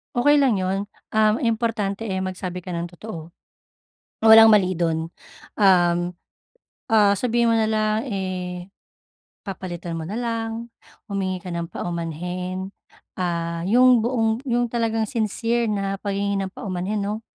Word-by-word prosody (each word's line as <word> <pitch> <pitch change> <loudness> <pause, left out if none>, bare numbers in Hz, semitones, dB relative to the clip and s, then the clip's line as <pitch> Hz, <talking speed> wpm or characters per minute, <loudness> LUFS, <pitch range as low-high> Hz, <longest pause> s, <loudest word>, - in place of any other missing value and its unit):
Okey 290 +5 +4
lang 230 -8 +2
'yon, 190 +2 -1 0.3
um, 215 0 +4
importante 225 -3 -1
eh, 190 -4 -2
magsabi 185 -1 -4
ka 180 -1 -6
ng 170 - -2
totoo, 175 -3 -9 0.9
walang 225 0 +9
mali 195 -4 +5
do'n. 165 -1 -1 0.5
Um, 175 -3 +5 0.9
ah, 205 -3 +4
sabihin 235 -1 +2
mo 225 - +3
na 220 - +2
lang, 215 +2 0
eh, 185 -3 -4 0.7
papalitan 175 -4 -5
mo 160 - -6
na 205 - -4
lang, 230 -1 -3 0.4
humingi 190 -1 -1
ka 180 - -5
ng 170 0 -3
paumanhin, 180 +3 -4 0.5
ah, 170 -1 -2
'yong 250 +2 +6
buong 225 -1 0
'yong 240 0 +2
talagang 225 -1 0
sincere 230 +2 -1
na 195 -2 -2
paghingi 200 0 -1
ng 195 - -2
paumanhin, 195 +2 -3
'no. 210 +2 -3
200 Hz, 135 wpm, -23 LUFS, 180-225 Hz, 0.9 s, walang